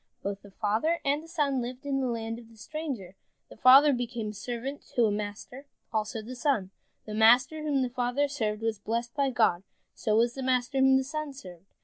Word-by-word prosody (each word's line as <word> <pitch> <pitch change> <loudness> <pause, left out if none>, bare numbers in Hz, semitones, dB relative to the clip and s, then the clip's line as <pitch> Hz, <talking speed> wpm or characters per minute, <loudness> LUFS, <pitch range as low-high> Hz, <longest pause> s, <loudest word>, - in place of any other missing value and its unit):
Both 200 0 -4
the 200 - -14
father 220 - 0
and 285 +2 +1
the 325 - -13
son 290 -6 0
lived 250 +3 -6
in 275 -1 0
the 260 - 0
land 230 -1 -3
of 230 -1 -15
the 225 - -18
stranger. 250 - -6 0.3
The - - -12
father 270 +5 +7
became 240 -3 -3
a - - -6
servant 245 +6 -5
to 240 -3 +4
a 215 - +2
master, 210 +6 -6 0.3
also 220 0 -2
the 245 +4 -7
son. 235 -8 0 0.3
The 215 - -7
master 245 +8 +5
whom 290 -3 +1
the 250 - -1
father 250 +3 0
served 220 -6 -2
was 225 -2 -1
blessed 235 +3 -3
by 280 -2 +1
God, 220 -8 +2 0.3
so 215 - 0
was 235 +2 +3
the 270 - -6
master 255 +1 0
whom 265 0 +6
the 265 - +1
son 305 +1 -5
served. 185 -8 -12
245 Hz, 215 wpm, -28 LUFS, 220-275 Hz, 0.3 s, father